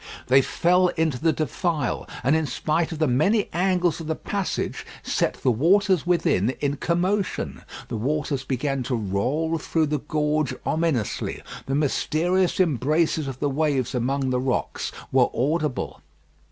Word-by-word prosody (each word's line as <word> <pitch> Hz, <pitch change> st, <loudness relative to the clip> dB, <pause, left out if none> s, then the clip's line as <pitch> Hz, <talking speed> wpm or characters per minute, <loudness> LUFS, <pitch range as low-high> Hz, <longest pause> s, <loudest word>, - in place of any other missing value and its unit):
They 135 Hz, +1 st, +7 dB
fell 180 Hz, +6 st, +3 dB
into 160 Hz, -6 st, +1 dB
the 160 Hz, +1 st, +3 dB
defile, 155 Hz, -2 st, -2 dB
and 140 Hz, +4 st, +3 dB
in 160 Hz, -1 st, +1 dB
spite 155 Hz, +6 st, -1 dB
of 160 Hz, -, -4 dB
the 155 Hz, 0 st, +2 dB
many 190 Hz, -, +2 dB
angles 180 Hz, -2 st, +1 dB
of 160 Hz, -, -7 dB
the 160 Hz, -, -1 dB
passage, 200 Hz, +2 st, -3 dB, 0.2 s
set -, -, 0 dB
the 130 Hz, -, +4 dB
waters 180 Hz, -, +3 dB
within 145 Hz, -, +2 dB
in 145 Hz, 0 st, -1 dB
commotion. 185 Hz, +5 st, -1 dB, 0.3 s
The 115 Hz, -, -4 dB
waters 140 Hz, +2 st, -1 dB
began 135 Hz, +1 st, -1 dB
to 125 Hz, -, +1 dB
roll 125 Hz, -, -1 dB
through 160 Hz, +1 st, +1 dB
the 150 Hz, 0 st, -1 dB
gorge 150 Hz, 0 st, 0 dB
ominously. 155 Hz, -, -1 dB, 0.2 s
The 135 Hz, -, 0 dB
mysterious 170 Hz, +6 st, +1 dB
embraces 155 Hz, -1 st, +1 dB
of 130 Hz, -1 st, -6 dB
the 145 Hz, -, 0 dB
waves 140 Hz, -4 st, 0 dB
among 130 Hz, +2 st, 0 dB
the 125 Hz, -, +1 dB
rocks 130 Hz, 0 st, -2 dB, 0.2 s
were -, -, +4 dB
audible. 150 Hz, +1 st, -1 dB
155 Hz, 150 wpm, -24 LUFS, 135-170 Hz, 0.3 s, They